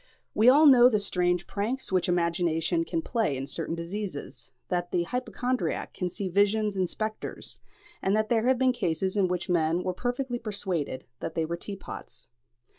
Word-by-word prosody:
We 220 +4 +6
all 295 +4 +7
know 250 -4 +8
the 215 -4 +2
strange 180 -3 0
pranks 225 +6 -2
which 185 -1 +1
imagination 170 -1 +1
can 165 - -2
play 220 - 0
in 135 - -4
certain 165 +3 0
diseases; 170 - -6 0.2
that 175 -1 -1
the 175 0 +1
hypochondriac 250 +4 -2
can 180 - -2
see 190 +2 -4
visions 205 +2 +2
and 185 -2 0
spectres; 215 0 -4 0.4
and 195 +2 +2
that 215 0 +1
there 230 +1 +1
have 260 0 +4
been 260 0 +3
cases 185 -2 -1
in 195 -3 +3
which 180 -1 -2
men 170 0 +1
were 185 - -1
perfectly 245 +4 -2
persuaded 190 - -3
that 160 - -5
they 165 - +1
were 170 +2 -3
teapots. 195 +3 -8
190 Hz, 175 wpm, -28 LUFS, 170-220 Hz, 0.4 s, know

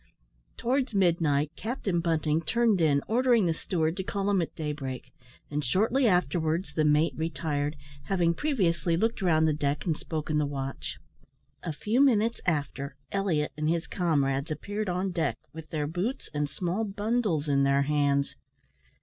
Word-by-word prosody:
Towards 255 -1 0
midnight, 160 -6 +2
Captain 215 -6 -2
Bunting 160 -2 +1
turned 220 +2 +2
in, 145 -3 +3
ordering 240 -2 +3
the 165 - +2
steward 160 0 -1
to 190 - -2
call 200 +1 -1
him 195 -3 +3
at 165 - -4
daybreak; 135 -5 -5 0.4
and 150 0 -1
shortly 225 - +2
afterwards 170 -3 +1
the 155 - +1
mate 150 +2 +3
retired, 150 -1 -2 0.3
having 175 -4 +2
previously 175 - +1
looked 225 +3 0
round 160 -4 +3
the 155 - +2
deck 145 -1 -1
and 165 -4 +1
spoken 155 -1 -2
the 150 - +1
watch. 135 -1 -5 0.6
A - - -3
few 215 - +1
minutes 230 -3 +2
after, 145 -3 -1 0.2
Elliot 180 -7 0
and 155 +1 -1
his 165 0 0
comrades 140 -4 0
appeared 205 +7 -3
on 185 +2 -1
deck, 160 -9 -1 0.2
with 160 0 -9
their 150 -2 -1
boots 180 - -3
and 150 -1 -1
small 175 +8 -2
bundles 205 -6 0
in 140 -1 +3
their 140 0 +3
hands. 140 -1 +1
165 Hz, 160 wpm, -28 LUFS, 150-195 Hz, 0.6 s, in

